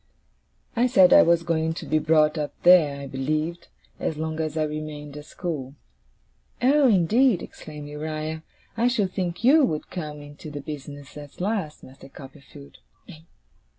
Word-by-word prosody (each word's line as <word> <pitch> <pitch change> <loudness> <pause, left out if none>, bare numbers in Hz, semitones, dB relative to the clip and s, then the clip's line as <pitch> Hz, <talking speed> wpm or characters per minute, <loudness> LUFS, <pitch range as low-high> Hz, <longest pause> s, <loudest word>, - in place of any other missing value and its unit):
I 240 +2 +3
said 190 -7 +6
I - - +9
was 170 0 +3
going 160 -1 -1
to - - -7
be 155 - +1
brought 155 0 +3
up 150 -2 -4
there, 160 -6 +6
I - - -6
believed, 155 +6 -3 0.3
as 155 - -2
long 160 0 -4
as 155 -1 -3
I 155 - +2
remained 150 -1 -6
at 150 0 -9
school. 150 -8 -5 0.8
'Oh, 275 +3 +4
indeed!' 215 +1 +3
exclaimed 150 -2 -10
Uriah. 155 +1 -5 0.4
'I 235 +2 +3
should 215 -7 0
think 180 +1 -3
YOU 290 +5 +6
would 155 - -2
come 150 -4 -6
into 145 +1 -11
the 145 -1 -6
business 145 -1 -9
at 145 -1 -11
last, 190 -5 -3
Master 135 +1 -14
Copperfield! 135 - -14
155 Hz, 155 wpm, -24 LUFS, 150-175 Hz, 0.8 s, I